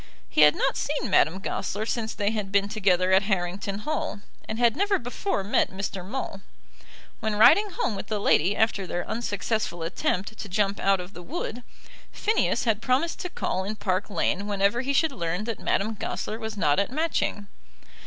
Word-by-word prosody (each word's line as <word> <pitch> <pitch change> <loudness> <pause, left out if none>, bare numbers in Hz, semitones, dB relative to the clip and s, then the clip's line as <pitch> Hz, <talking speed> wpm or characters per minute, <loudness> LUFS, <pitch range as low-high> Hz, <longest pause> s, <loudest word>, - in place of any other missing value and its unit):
He - - +2
had 150 0 +7
not - - 0
seen 280 -7 -2
Madame 170 +1 +4
Goesler 200 +2 -3
since 225 -1 -2
they 205 0 0
had 210 -3 -3
been 200 0 +3
together 185 -3 +2
at 190 +1 +6
Harrington 195 0 -2
Hall, 305 -5 -3 0.3
and 220 - -2
had 235 -1 +3
never 400 +1 +2
before 245 - -2
met 200 - +2
Mr. 190 -1 -4
Maule. 200 -1 -5 0.8
When 220 -1 -1
riding 405 - +6
home 390 - -2
with 195 - -6
the 215 - -1
lady 200 0 +3
after 205 -4 +1
their 175 - -3
unsuccessful 220 -5 -2
attempt 190 +5 -2
to 205 - -6
jump 200 +1 0
out 195 -1 +3
of 180 +2 -8
the 175 - -9
wood, 245 - -5 0.5
Phineas 435 +1 +1
had 225 -3 +1
promised 270 +7 +1
to 360 - -4
call 190 - -2
in 205 +3 -3
Park 200 -1 -1
Lane 200 0 0
whenever 205 +3 +1
he 270 +2 -1
should 310 +3 +3
learn 175 -5 -2
that 225 -1 -4
Madame 215 +3 0
Goesler 215 +1 -4
was 220 -1 -5
not 145 -5 +3
at 200 - +1
Matching. 300 -8 -1
205 Hz, 185 wpm, -26 LUFS, 195-235 Hz, 0.8 s, had